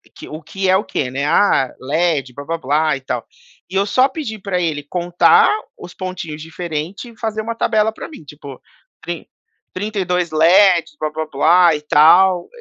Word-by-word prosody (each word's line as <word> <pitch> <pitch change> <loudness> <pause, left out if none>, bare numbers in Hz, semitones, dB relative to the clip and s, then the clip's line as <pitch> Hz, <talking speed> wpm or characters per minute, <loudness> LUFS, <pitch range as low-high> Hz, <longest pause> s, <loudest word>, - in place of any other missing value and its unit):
que - - -11
o 155 +2 -8
que 190 +5 -3
é 190 - +5
o 200 - -3
quê, 125 -3 -3
né. 140 +2 -2
Ah, 145 -5 +2
LED 145 -1 -1
blá-blá-blá 150 +1 -1
e 135 - -8
tal. 125 -3 -5 0.4
E 185 - -8
eu 195 +1 +2
só 255 +6 +3
pedi 265 -7 -6
pra 190 -2 -2
ele 155 -3 -2
contar 175 - +3 0.3
os 175 - -11
pontinhos 175 -5 -6
diferente 165 +6 -6
e 230 - -17
fazer 220 -1 -3
uma 230 +1 -5
tabela 220 -1 +1
pra - - -9
mim, 305 - -13
tipo, 140 -2 -12 0.4
trin - - -6 0.5
trinta 205 +2 -4
e 185 - -1
dois 180 -2 -1
LEDs 170 +1 +4
blá-blá-blá 155 +2 +2
e 150 - -6
tal. 175 +4 +4
175 Hz, 175 wpm, -18 LUFS, 150-195 Hz, 0.5 s, é